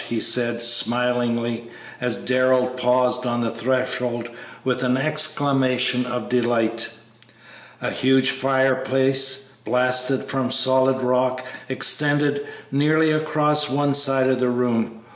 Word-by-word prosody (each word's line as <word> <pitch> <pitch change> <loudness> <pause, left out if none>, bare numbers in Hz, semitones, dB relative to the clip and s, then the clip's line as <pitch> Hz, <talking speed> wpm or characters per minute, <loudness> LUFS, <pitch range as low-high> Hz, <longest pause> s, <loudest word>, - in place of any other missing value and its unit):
'" - - -12
he 115 - -1
said, 120 0 +1
smilingly, 120 0 0 0.3
as 125 -2 0
Darrell 130 0 +2
paused 125 0 0
on 120 0 -1
the 115 -1 -2
threshold 120 -1 -2 0.3
with 125 -1 -1
an 125 0 +1
exclamation 135 -4 0
of 125 -2 -4
delight. 115 -2 0 0.9
A - - -1
huge 130 0 +2
fireplace, 135 0 0
blasted 125 +1 +1
from 130 -2 -2
solid 130 0 +2
rock, 125 0 0 0.2
extended 145 +1 +1 0.3
nearly 155 +3 +2
across 150 -1 +1
one 145 +1 0
side 135 -2 +3
of 130 -1 +1
the 125 -1 +1
room. 115 -2 -1
130 Hz, 120 wpm, -21 LUFS, 125-135 Hz, 0.9 s, side